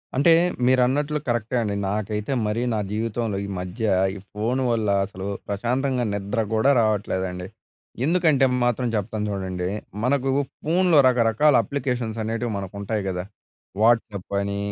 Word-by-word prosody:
అంటే 145 +6 +5 0.3
మీరన్నట్లు 130 +4 +2
కరెక్టే 120 0 -1
అండి. 105 -3 -1
నాకైతే 105 +3 -2 0.2
మరీ 105 +3 -1
నా 110 - 0
జీవితంలో 110 -1 -2
ఈ - - -6
మధ్య, 90 +5 -4 0.3
ఈ - - -6 0.2
ఫోను 120 +5 -1
వల్ల 110 -3 0 0.2
అసలు 95 -1 -7 0.2
ప్రశాంతంగా 125 +5 0
నిద్ర 100 +3 -2 0.2
కూడా 120 +6 +4
రావట్లేదండి. 95 -4 -1 0.6
ఎందుకంటే, 160 -5 +3 0.2
మాత్రం 120 +1 +1
చెప్తాను 105 +1 -2
చూడండి. 95 -2 -3 0.4
మనకు 135 +1 +1 0.3
ఫోన్‌లో 175 +1 +3
రకరకాల 125 +4 +3
అప్లికేషన్స్ 125 -5 -3
అనేటివి 115 +2 -2
మనకు 95 -1 -6
ఉంటాయి 100 +1 -2
గదా! 90 -1 -2 0.6
వాట్సాప్ 110 -4 +1
అని, 100 0 -2
115 Hz, 130 wpm, -24 LUFS, 100-130 Hz, 0.6 s, అంటే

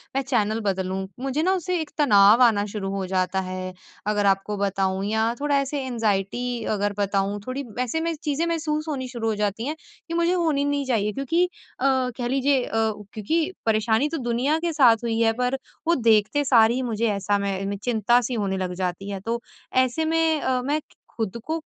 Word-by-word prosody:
मैं 270 - +2
चैनल 225 -5 0
बदलूँ। 190 -2 -1 0.3
मुझे 275 +3 0
ना 375 +2 +3
उसे 365 0 -1
एक 315 - -6
तनाव 215 -4 +5
शुरू 200 -2 -3
हो 195 -1 -2
जाता 185 0 0
है 185 0 -5 0.3
अगर 205 -1 +1
आपको 195 +1 +1
बताऊँ 195 -1 0
या 220 +2 +1
थोड़ा 285 0 +1
ऐसे 275 +1 -2
एंग्जायटी 225 -2 -1 0.3
अगर 205 0 -1
बताऊँ 200 0 0
थोड़ी 265 +2 -3 0.2
ऐसे 255 +6 -1
मैं 335 0 -1
चीज़ें 300 +2 0
महसूस 310 -2 -1
होनी 270 -4 -3
शुरू 235 -3 -4
हो 220 - 0
जाती 210 +2 -1
हैं 305 - -2 0.3
कि 335 - -5
मुझे 340 +1 +2
होनी 320 -6 +1
नहीं 285 -1 0
चाहिए 215 -5 +1
क्योंकि 275 - +1 0.4
अ, 260 - -1 0.3
कह 245 -2 -2
लीजिए 270 0 +2
अ, - - -9 0.4
क्योंकि 315 - 0
परेशानी 220 +5 +2
तो 325 - -3
दुनिया 260 +7 +1
के 335 - -1
साथ 245 -6 +5
हुई 225 -1 -1
है 225 -1 +4
पर 250 +2 +1 0.3
वो 340 - +4
देखते 220 +7 +3
सार 230 -4 +5
ही 250 +2 -1
मुझे 225 +1 0
ऐसा 200 +1 0
मैं 200 0 -2
चिंता 240 0 +3
सी 250 +2 -3
होने 200 -4 -1
लग 185 -1 -2
जाती 185 +2 -3
है। 200 -1 -4
तो 230 +4 -3 0.4
ऐसे 260 +6 -1
में 320 -1 +2
अ, 255 -1 0
मैं 290 +4 0 0.4
खुद 220 -2 -2
को 320 +1 -2
235 Hz, 195 wpm, -24 LUFS, 205-285 Hz, 0.4 s, तनाव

